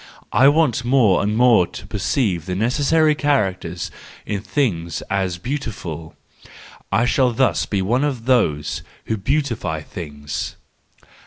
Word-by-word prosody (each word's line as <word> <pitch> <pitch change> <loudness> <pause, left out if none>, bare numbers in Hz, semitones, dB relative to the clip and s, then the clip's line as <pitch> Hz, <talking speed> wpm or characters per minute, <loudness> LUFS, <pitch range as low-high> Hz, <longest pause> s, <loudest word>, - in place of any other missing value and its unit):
I 130 +6 +6
want 145 -6 +3
more 120 -6 +4
and 105 +2 0
more 120 -7 +5
to - - -10
perceive 95 - -1
the 90 - -2
necessary 145 - +3
characters 95 - -1 0.3
in 105 -2 -3
things 95 - -1
as 95 -2 0
the 85 - -14
beautiful: 90 - -5 0.4
— - - -17 0.3
I 115 - +3
shall 125 0 +3
thus 130 +3 +1
be 100 -3 0
one 120 +8 +1
of 130 -6 -2
those 75 - +1 0.2
who 110 - -1
beautify 115 - -1
things. 75 -3 -6
110 Hz, 140 wpm, -21 LUFS, 90-130 Hz, 0.4 s, I